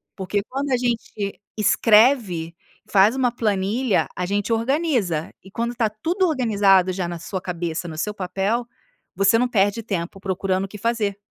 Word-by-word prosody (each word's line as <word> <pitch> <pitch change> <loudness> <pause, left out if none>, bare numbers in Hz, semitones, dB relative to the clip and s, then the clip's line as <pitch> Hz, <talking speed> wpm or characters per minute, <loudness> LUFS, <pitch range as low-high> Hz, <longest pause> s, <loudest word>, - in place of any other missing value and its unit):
Porque 195 +1 -2
quando 275 +1 -3
a 255 - +3
gente 230 -4 -3 0.2
escreve, 210 -6 +3 0.3
faz 205 +4 +5
uma 250 -2 +2
planilha, 215 +1 0
a 180 - -2
gente 205 +4 -1
organiza; 230 - 0
e 190 - -13
quando 235 +3 -2
tá 230 -3 +1
tudo 340 - 0
organizado, 205 - +3
já 180 -1 -2
na 170 -1 -5
sua 185 +3 -5
cabeça 170 -2 -4
no 160 -2 -7
seu 210 +6 -2
papel, 195 +5 -1 0.5
você 195 +4 +4
não 250 +2 +2
perde 205 -1 +1
tempo 190 -3 -4
procurando 190 0 -1
o - - -8
que 210 - -10
fazer. 210 -2 -1
205 Hz, 165 wpm, -22 LUFS, 190-235 Hz, 0.5 s, faz